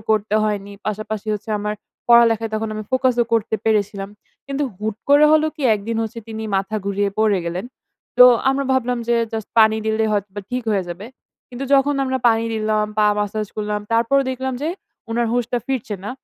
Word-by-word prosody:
করতে 215 -1 +1
হয়নি। 205 -1 -2
পাশাপাশি 215 0 -4
হচ্ছে, 210 +2 -7
আমার 210 +1 -2 0.3
পড়ালেখায় 230 -2 +5
তখন 220 0 -2
আমি 215 - -4
ফোকাস 260 -1 +2
ও - - -2
করতে 225 -1 +1
পেরেছিলাম। 205 -2 0 0.4
কিন্তু 275 +1 -2 0.2
হুট 215 0 -3
করে 290 +1 +7
হলো 310 0 +4
কি, 295 - -7
একদিন 220 +3 -4
হচ্ছে 225 +1 -5
তিনি 220 0 -5
মাথা 195 +3 -2
ঘুরিয়ে 200 0 0
পড়ে 215 -3 +3
গেলেন। 175 +3 -3 0.5
তো 250 - +11 0.3
আমরা 275 +1 -1
ভাবলাম 250 -1 0
যে 240 - +3 0.2
জাস্ট 220 -2 -4
পানি 220 0 +6
দিলেই 220 0 +1
হয়তোবা 205 0 -2
ঠিক 250 0 -2
হয়ে 195 -3 0
যাবে। 180 +5 -7 0.4
কিন্তু 250 +2 -6
যখন 275 +1 +3
আমরা 260 0 -1
পানি 225 0 +2
দিলাম, 215 -1 0
পা 210 - +5
ম্যাসাজ 210 +1 -2
করলাম, 210 0 -2
তারপরও 235 +5 +3
দেখলাম 260 0 -3
যে, 315 - 0 0.4
উনার 235 +1 0
হুশটা 245 0 0
ফিরছে 255 -5 -2
না। 210 - -4
220 Hz, 185 wpm, -20 LUFS, 210-245 Hz, 0.5 s, তো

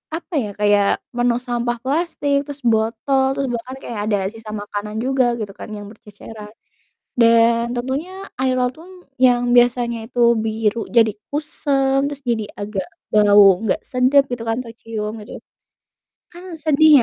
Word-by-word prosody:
apa 345 +2 -9
ya, 210 - -5
kayak 205 -1 +3 0.3
penuh 245 0 +1
sampah 240 0 -1
plastik, 285 0 0
terus 285 -1 -8
botol, 225 +5 +1
terus 275 - -1
bahkan 250 +3 -7
kayak 230 -3 -5
ada 210 -1 +1 0.2
sisa 225 -1 -10
makanan 210 +1 -6
juga 265 -1 +2 0.2
gitu 205 -2 -5
kan - - -8
yang 205 -1 -9
berceceran. 210 0 -12 0.7
Dan, 230 +1 +4
tentunya 265 +8 -3 0.3
air 260 -1 +1
laut 250 0 +1
tun 345 - -13 0.4
yang 245 -1 +4
biasanya 240 -1 +3
itu 245 0 -6 0.3
biru 220 0 0 0.2
jadi 225 -2 +5 0.2
kusam, 280 -2 0
terus 285 -1 -7
jadi 230 -4 -1
agak 205 -2 -4 0.2
bau 205 -3 +6
gak - - 0
sedap 260 +2 +4
gitu 235 -2 -4
kan 225 - 0
tercium 225 -2 -6
gitu. - - -13 1.0
Kan 350 +1 -12 0.2
sedih 310 0 +5
235 Hz, 150 wpm, -20 LUFS, 215-270 Hz, 1.0 s, bau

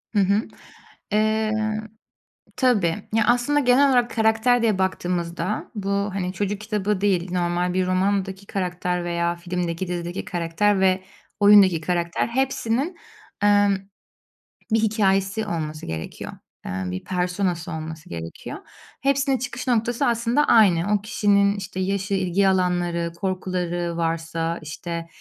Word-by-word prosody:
Hı - - +4
hı. 200 +2 +3 0.7
Eee, 215 0 +2 1.0
tabii. 210 -10 +2 0.2
Ya, 220 -1 +3
aslında 245 +5 +3
genel 270 +1 +4
olarak 245 -2 +3
karakter 225 +2 +3
diye 215 -4 +2
baktığımızda 180 0 -2
bu, 200 -1 -3
hani, 200 -2 -1
çocuk 205 +1 -2
kitabı 210 -2 -1
değil, 185 -3 +1
normal 175 0 0
bir 185 0 +1
romandaki 195 +1 0
karakter 180 -2 -2
veya 170 0 -1
filmdeki, 175 0 -3
dizideki 175 +1 -4
karakter 190 +2 +1
ve 190 0 +2 0.4
oyundaki 200 -5 +6
karakter 170 +2 -1
hepsinin, 265 +5 -1 0.5
emm, 205 -1 +4 1.0
bir 225 - +4
hikâyesi 205 -1 +1
olması 155 -4 -4
gerekiyor. 80 0 -6 0.3
Eee, - - -4
bir 90 0 -4
persona'sı 180 -1 -1
olması 160 0 -7
gerekiyor. 85 -1 -7 0.4
Hepsinin 275 -1 +2
çıkış 250 +2 -5
noktası 240 +3 +1
aslında 235 +4 +2
aynı. 200 -3 +4
O 205 - +2
kişinin, 200 -1 +2
işte, 190 -1 -6
yaşı, 195 +1 -1
ilgi 190 +1 +2
alanları, 175 -2 +1
korkuları 180 -2 -2
varsa, 165 0 -2
işte. 165 +2 -6
190 Hz, 125 wpm, -23 LUFS, 175-215 Hz, 1.0 s, oyundaki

